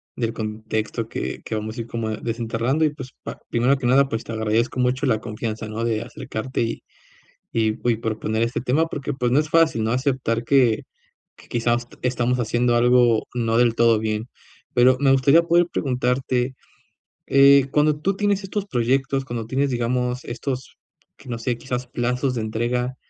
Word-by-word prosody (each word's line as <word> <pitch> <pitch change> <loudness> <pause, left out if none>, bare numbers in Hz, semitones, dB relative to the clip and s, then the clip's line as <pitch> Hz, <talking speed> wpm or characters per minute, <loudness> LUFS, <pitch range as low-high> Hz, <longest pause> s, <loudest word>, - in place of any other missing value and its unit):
del 115 -1 -2
contexto 110 +1 -3
que - - -5
que - - -5
vamos 110 +2 -4
a - - -2
ir 115 - -7
como 115 -1 -3
desenterrando 115 +6 -1
y - - +3
pues 130 -3 -9
pa - - -7
primero 125 +4 +2
que 130 - -5
nada, 135 +2 +4
pues 115 - -3
te - - -8
agradezco 110 +3 0
mucho 125 +3 +1
la 110 -4 +2
confianza, 110 -1 -5
¿no?, 110 +2 -4
de 115 -1 0
acercarte 115 +1 -5
y 115 - -4 0.7
y 110 0 0
y - - +1
proponer 110 0 -2
este 115 +1 -2
tema 140 +6 +2
porque, 145 -2 -4
pues, 125 -2 -1
no 140 - +4
es 155 0 -1
fácil, 160 -9 +3
¿no?, 110 - 0
aceptar 125 -3 0
que 125 -3 +3 0.7
quizás 120 0 0 0.2
estamos 125 0 0
haciendo 120 +1 +1
algo 120 -1 +4
no 115 -1 0
del 120 -1 +4
todo 115 -1 +4
bien, 110 +1 -2 0.5
pero 125 +1 +6
me 135 -1 +4
gustaría 140 +5 +5
poder 170 +1 +4
preguntarte, 125 -1 0 0.7
eh, 140 0 +6
cuando 150 0 +3
tú 195 +4 0
tienes 205 -1 0
estos 200 +1 -4
proyectos, 135 +2 0
cuando 115 -3 -5
tienes, 135 +2 0
digamos, 125 +1 -1
estos, 130 +2 -5 0.4
que 130 - -14
no 115 -1 -3
sé, 120 0 -2
quizás 125 -1 -4
plazos 125 +1 -1
de 115 - -1
entrega, 120 +3 -2
125 Hz, 175 wpm, -22 LUFS, 115-135 Hz, 0.7 s, pero